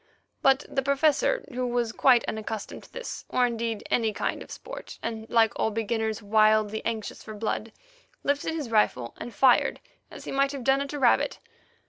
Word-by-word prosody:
But 270 +1 +4
the 270 - -1
Professor, 285 - +2
who 250 0 -1
was 240 -2 0
quite 245 0 +4
unaccustomed 220 -1 -5
to - - -19
this, - - -6
or, 250 - +3
indeed, 230 -2 -2
any 225 -2 +2
kind - - -2
of - - -10
sport, - - -9
and, 225 -1 -4
like 225 -2 +4
all - - +2
beginners, 220 0 -2
wildly 215 0 +3
anxious 220 -2 -3
for 215 - -9
blood, 220 +1 -3 0.5
lifted 285 +3 0
his 290 -8 -4
rifle 125 - +2
and 240 - -6
fired, 250 +3 +4 0.3
as - - -10
he - - -5
might 275 +1 +1
have 275 -3 -5
done 270 +2 +3
at 280 +1 -4
a - - -3
rabbit. 255 -4 +3
230 Hz, 180 wpm, -27 LUFS, 220-270 Hz, 0.5 s, But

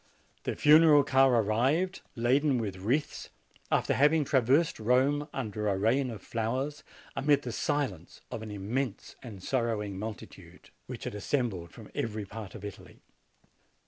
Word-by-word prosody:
The - - -1
funeral 150 -1 +6
car 135 -1 +4
arrived, 135 - +1
laden 130 +4 +2
with 100 -5 -3
wreaths, 125 +11 -2 0.4
after - - +2
having 150 +2 +3
traversed 135 +3 +2
Rome 130 +6 +2
under 105 -5 -3
a 100 -2 +1
rain 125 +7 +2
of 110 -5 -8
flowers, 130 +6 -3 0.3
amid 145 0 +2
the 120 - -4
silence 110 - -2
of - - -5
an 110 - -7
immense 105 +4 -4
and 105 -7 -10
sorrowing 110 -6 -1
multitude, 110 0 -9 0.2
which - - -7
had - - -4
assembled 105 -5 -2
from 110 +4 -13
every 110 -2 -3
part 105 0 -9
of 105 -2 -8
Italy. 100 - -11
120 Hz, 145 wpm, -29 LUFS, 105-140 Hz, 0.4 s, funeral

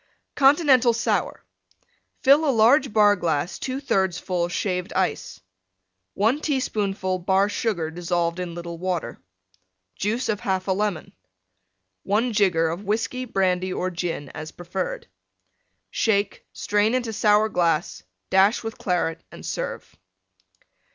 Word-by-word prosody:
CONTINENTAL 270 -4 +5
SOUR 230 - -1 0.8
Fill 280 +3 +6
a 305 - +2
large 260 +3 +4
Bar 210 -1 +5
glass 170 -1 -2
2/3 195 -10 -1
full 175 -2 -1
Shaved 180 0 -2
Ice. - - -2 0.8
1 230 +9 +1
teaspoonful 200 -10 -1
Bar 190 +2 +2
Sugar 180 -8 -2
dissolved 175 0 -1
in 175 -2 -5
little 170 -1 -7
Water. 175 -9 -3 0.7
Juice 225 +6 -1
of 210 - -1
1/2 190 0 -1
Lemon. 205 -5 -2 0.9
1 225 +4 0
jigger 180 -6 +2
of 170 +5 -5
Whiskey, 225 +5 -2
Brandy 185 -4 0
or 185 0 -2
Gin, 170 -5 -4
as 155 0 -8
preferred. 180 +2 -5 0.9
Shake; 205 -3 0
strain 210 +3 +1
into 240 -3 -2
Sour 210 +1 +3
glass; 170 -4 0 0.3
dash 195 +5 +4
with 225 0 -6
Claret 170 -3 -1
and - - -11
serve. - - -5
195 Hz, 120 wpm, -24 LUFS, 175-225 Hz, 0.9 s, Fill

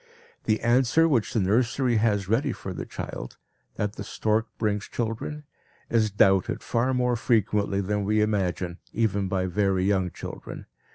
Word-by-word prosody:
The 110 -1 +1
answer 125 +7 +4
which 125 -9 +1
the 120 - +1
nursery 115 +5 +2
has 105 -3 +1
ready 130 +7 +1
for 95 - -6
the - - -6
child, - - -7 0.4
that 105 0 -3
the - - -4
stork 110 +1 0
brings 105 -2 -1
children, 120 +6 -4 0.5
is 110 -2 +3
doubted 95 -2 +2
far 120 +2 +1
more 125 -1 +1
frequently 105 -3 +1
than 105 +1 -1
we 105 +2 +1
imagine, 95 -4 0
even 100 -3 +1
by 95 -1 0
very 95 0 +1
young 95 -2 +2
children. - - -8
105 Hz, 155 wpm, -26 LUFS, 100-115 Hz, 0.5 s, answer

